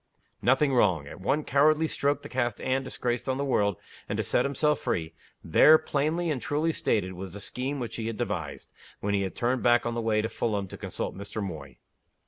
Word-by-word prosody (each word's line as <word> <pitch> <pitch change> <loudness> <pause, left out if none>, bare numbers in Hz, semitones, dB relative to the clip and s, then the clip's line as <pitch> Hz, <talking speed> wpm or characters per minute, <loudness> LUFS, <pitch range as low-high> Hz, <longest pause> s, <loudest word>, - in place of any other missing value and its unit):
Nothing 135 +2 +3
wrong. 90 - +3
At 70 - -10
one 145 +10 +1
cowardly 155 +3 +3
stroke 145 -2 0
to - - -6
cast 120 -3 -1
Anne 130 +1 0
disgraced 125 -1 -3
on 130 - 0
the 140 - -1
world, 100 -7 +1 0.3
and - - -1
to - - 0
set - - +2
himself 150 +2 +1
free 80 -2 -2 0.3
there, 155 +1 +7
plainly 155 +3 -1
and 135 -5 -2
truly 155 +3 0
stated, 95 - 0
was 95 0 -7
the 100 - -6
scheme 130 +7 -3
which 120 -3 -4
he 110 -1 -3
had 115 -2 -4
devised, - - -4 0.3
when 100 0 -1
he 100 - +2
had 95 -1 -3
turned 125 +1 0
back 120 -1 +4
on 120 - -1
the 115 - -2
way 110 -1 +1
to - - 0
Fulham 105 -4 -2
to - - -8
consult - - -5
Mr. 100 +2 -6
Moy. 80 - -6
120 Hz, 215 wpm, -28 LUFS, 100-140 Hz, 0.3 s, there